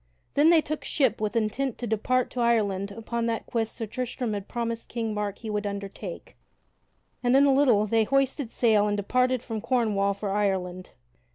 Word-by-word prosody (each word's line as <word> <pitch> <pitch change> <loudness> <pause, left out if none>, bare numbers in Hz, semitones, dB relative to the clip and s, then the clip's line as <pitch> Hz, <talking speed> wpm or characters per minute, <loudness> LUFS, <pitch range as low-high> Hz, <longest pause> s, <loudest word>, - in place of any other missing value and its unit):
Then 295 +3 +5
they 335 -2 +6
took 310 0 -4
ship 265 -7 +1
with 215 +2 -1
intent 230 +3 -1
to 245 - -4
depart 235 +3 0
to 250 - -5
Ireland 205 -4 +1
upon 230 +2 -3
that 230 -1 -2
quest 225 -2 -2
Sir 225 - -3
Tristram 245 +1 -3
had 200 -1 -5
promised 230 -1 -4
King 225 -2 -2
Mark 205 -1 -3
he 225 - -7
would 210 0 -1
undertake, 200 -1 -7 0.9
and 245 +1 +3
in 275 +1 +6
a 275 - +5
little 250 -7 +4
they 220 +1 +2
hoisted 275 0 +1
sail 215 -3 +3
and 205 0 0
departed 250 +4 +1
from 225 -3 -4
Cornwall 210 -5 +1
for 200 0 -4
Ireland. 190 -3 -1
225 Hz, 185 wpm, -26 LUFS, 205-250 Hz, 0.9 s, they